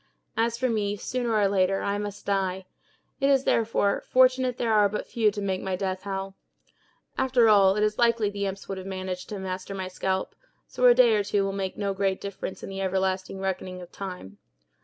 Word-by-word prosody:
As 230 +1 +1
for 255 +1 +1
me, 210 -3 -1
sooner 240 +1 -2
or 205 -2 +4
later, 195 0 +1
I 200 0 -1
must 205 -1 -6
die; 190 -1 -1 0.5
it 275 0 +2
is, 270 -1 +4
therefore, 220 -4 +1
fortunate 255 -1 +3
there 230 -2 0
are 210 -1 +5
but 210 - -4
few 225 -3 +2
to 205 0 -5
make 190 -1 -1
my 190 -1 -2
death 185 0 -3
howl. 195 0 -4 0.9
After 255 -3 +4
all, 195 -3 +6
it 210 - +1
is 215 0 0
likely 235 -2 +3
the 200 0 -2
imps 195 0 -6
would 195 -1 -4
have 185 - -8
managed 185 -1 -5
to 210 - -5
master 190 +1 -5
my 190 -1 -4
scalp, 190 +1 -2 0.3
so 250 - -1
a 240 - +7
day 240 -2 +6
or 205 - +1
two 200 0 0
will 195 0 -2
make 195 -1 -3
no 200 -1 -1
great 195 -1 0
difference 200 -1 -6
in - - -6
the 195 0 -5
everlasting 190 0 -1
reckoning 185 -1 -3
of 180 -1 -11
time. 180 - -8
200 Hz, 210 wpm, -26 LUFS, 190-220 Hz, 0.9 s, a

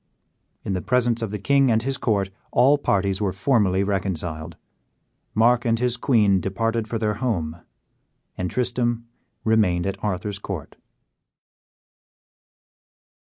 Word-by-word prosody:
In 100 - -1
the 90 - -2
presence 120 0 +1
of 115 - -2
the 105 - -4
king 135 +5 +3
and 110 -1 +2
his 135 0 -2
court 100 -4 0 0.2
all 135 +4 +4
parties 100 -5 0
were 100 -2 +1
formally 95 -2 +2
reconciled; 90 -5 -3 0.8
Mark 120 +2 +4
and 115 -1 +1
his 125 0 0
queen 105 -7 +3
departed 115 +4 -1
for 115 - -2
their 105 -1 0
home, 90 -9 -2 0.8
and 90 -1 -3
Tristram 120 -1 -1 0.4
remained 105 -6 +2
at 95 0 -4
Arthur's 100 0 -2
court. 95 -7 -6
105 Hz, 125 wpm, -23 LUFS, 95-120 Hz, 0.8 s, all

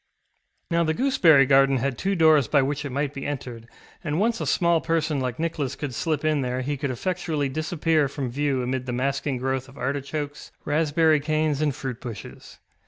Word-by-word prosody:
ŌĆØ - - -42
Now 170 0 +3
the 160 -1 0
gooseberry 165 - +5
garden 135 0 +4
had 135 +1 -1
two 195 +10 -1
doors 155 - +5
by 140 +1 +3
which 145 +2 -2
it 140 - -4
might 140 +2 -2
be 135 - -5
entered, 125 -5 -6 0.4
and 155 0 -1
once 225 +2 +1
a - - -2
small 170 -2 +2
person 160 -3 0
like 125 -2 -3
Nicholas 160 -5 -2
could 145 -4 -5
slip 155 +2 -1
in 155 -2 +2
there 125 0 -2
he 145 +3 -2
could 140 0 -3
effectually 155 0 -2
disappear 155 +1 0
from 135 -3 -4
view 135 -1 0
amid 130 +1 -3
the 125 - -2
masking 135 +2 -1
growth 130 +1 -2
of 135 - -16
artichokes, 145 +2 -4
raspberry 155 +1 +2
canes, 155 0 0
and 145 -3 0
fruit 125 -3 -6
bushes. 120 -4 -9
145 Hz, 195 wpm, -24 LUFS, 135-155 Hz, 0.4 s, gooseberry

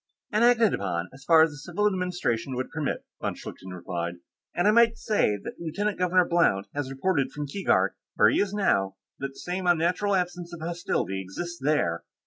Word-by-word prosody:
"And 215 +1 +2
acted 235 -3 +5
upon, 90 -3 -2
as 135 0 -14
far 160 0 +7
as 160 - +1
the 145 - -10
civil 175 +7 -2
administration 180 - -1
would 130 +1 -3
permit," 155 -3 -3 0.2
von - - -2
Schlichten 95 - -9
replied. 85 -1 -4 0.4
"And 175 - +2
I - - +7
might 230 0 +5
say 205 - +1
that - - -9
Lieutenant 180 +5 -2
Governor 180 0 +3
Blount 170 - +2
has 145 -2 -3
reported 135 0 0
from 145 +2 -4
Keegark, 190 +8 +1 0.2
where - - +6
he - - +1
is 200 -1 +1
now, 100 - +1 0.2
that 135 0 -4
the - - -14
same 180 +1 -3
unnatural 175 +4 +2
absence 180 -1 -2
of - - -11
hostility 165 - -2
exists 170 - -6
there." 130 - +1
170 Hz, 190 wpm, -27 LUFS, 130-185 Hz, 0.4 s, far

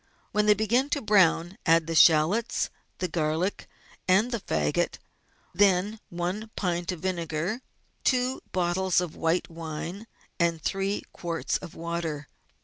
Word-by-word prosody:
When 210 -1 +1
they 210 - +7
begin 235 +7 +1
to - - -1
brown 190 -2 +3
add 165 -1 +4
the 165 - -3
shallots, 165 +8 +4 0.3
the 180 - -1
garlic, 160 +3 -1 0.4
and 205 +7 +4
the 235 - -1
faggot, 75 - 0 0.6
then 200 +3 +3
one 180 +5 -3
pint 175 -2 -1
of 175 -3 -7
vinegar, 175 +4 -2 0.4
two 255 0 +1
bottles 180 0 +1
of 175 -3 -3
white 165 +2 0
wine, 165 +6 -6 0.3
and 170 -1 +2
three 195 +5 -1
quarts 170 -1 -2
of 165 - -10
water. 165 -3 -4
180 Hz, 135 wpm, -27 LUFS, 165-205 Hz, 0.6 s, they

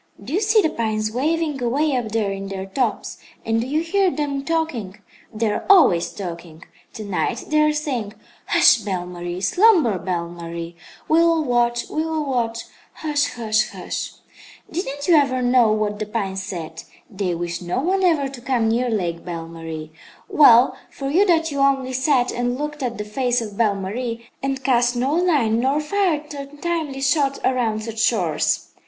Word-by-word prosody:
"Do 255 - -7
you 385 - +1
see 430 0 +4
the 315 - +1
pines 215 -1 -1
waving, 300 +3 -1
away 275 +4 +1
up 240 -3 -2
there 215 -3 0
in 195 0 -5
their 190 -1 -5
tops, 220 +3 -2 0.3
and 225 0 +1
do 240 - -4
you 300 +4 0
hear 380 +3 +2
them 285 -4 -2
talking? 285 - -2 0.3
They 220 -1 -1
are - - -3
always 320 - +5
talking. 170 -4 -8 0.3
To 220 - -7
night 200 +4 -2
they 305 0 +3
are 305 0 +4
saying: 265 -9 -3 0.3
'Hush, - - +6
Belle 195 -5 -3
Marie; 175 0 -6
slumber, 325 - +4
Belle 170 -1 -2
Marie; 170 0 -7 0.3
we 315 - +4
will 335 -1 +3
watch, 240 -2 +1
we 310 - -2
will 320 -2 -2
watch, 235 -4 -1 0.3
hush, 290 -2 -1
hush, 215 -2 +1
hush!' - - -5 0.6
Didn't 285 -4 -4
you 350 - +5
ever 270 -5 +3
know 245 -3 +4
what 210 -1 -1
the 215 - -3
pines 195 -3 -3
said? 165 -4 -6 0.3
They 190 -4 -2
wish 170 0 -4
no 175 +7 -2
one 375 +7 0
ever 320 -6 +3
to 265 -2 -10
come 240 -3 +1
near 245 +2 +1
Lake 175 -6 -2
Belle 165 -2 -6
Marie. 165 -1 -7 0.4
Well 245 -3 +6
for 275 0 -5
you 390 +7 +4
that 325 -2 +2
you 280 - -3
only 270 -2 +2
sat 260 -1 +2
and 245 +1 -1
looked 295 +1 -5
at 240 -3 -2
the 210 - -4
face 245 +3 0
of 215 -3 -6
Belle 210 -2 +2
Marie, 230 +4 -4
and 270 -1 -2
cast 245 -1 +2
no 260 +4 0
line 295 -11 +2
nor 270 +4 +1
fired 305 -2 -1
untimely 290 0 -4
shot 275 0 +2
around 230 -4 0
such 225 0 -6
shores! 185 -9 +1
245 Hz, 180 wpm, -21 LUFS, 205-295 Hz, 0.6 s, Hush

